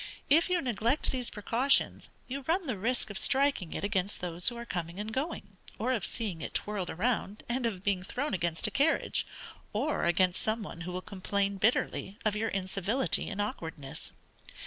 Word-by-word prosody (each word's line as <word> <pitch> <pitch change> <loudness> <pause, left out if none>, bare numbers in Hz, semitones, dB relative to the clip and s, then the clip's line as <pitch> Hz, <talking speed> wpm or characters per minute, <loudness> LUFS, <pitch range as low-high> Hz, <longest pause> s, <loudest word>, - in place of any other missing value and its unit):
If 330 +5 +6
you 360 -1 +3
neglect 240 +3 +1
these 250 -2 -1
precautions, 240 +6 +3 0.2
you 275 +2 -4
run 345 +3 +2
the 255 -6 -1
risk 225 +3 0
of 200 - -3
striking 270 - +3
it - - -4
against 200 -1 0
those 175 0 0
who 240 - -8
are 235 - -6
coming 175 -3 -4
and 215 +1 -4
going, 260 - -3 0.2
or 240 +4 0
of 225 -7 0
seeing 200 -9 -3
it - - -5
twirled 205 -4 -1
round, 215 +1 -1
and 240 0 +1
of 195 -5 -4
being 200 -3 +1
thrown 255 +9 -2
against 170 -3 0
a - - +3
carriage, 295 +4 +2 0.5
or 275 +9 0
against 180 +1 +3
some 220 0 0
one 170 -4 -8
who 175 +1 -4
will 180 +1 -4
complain 200 0 -1
bitterly 205 -1 +1
of 215 -1 +2
your 220 +1 0
incivility 195 +6 0
and 205 0 -5
awkwardness. 160 -8 -4
210 Hz, 185 wpm, -31 LUFS, 185-250 Hz, 0.5 s, If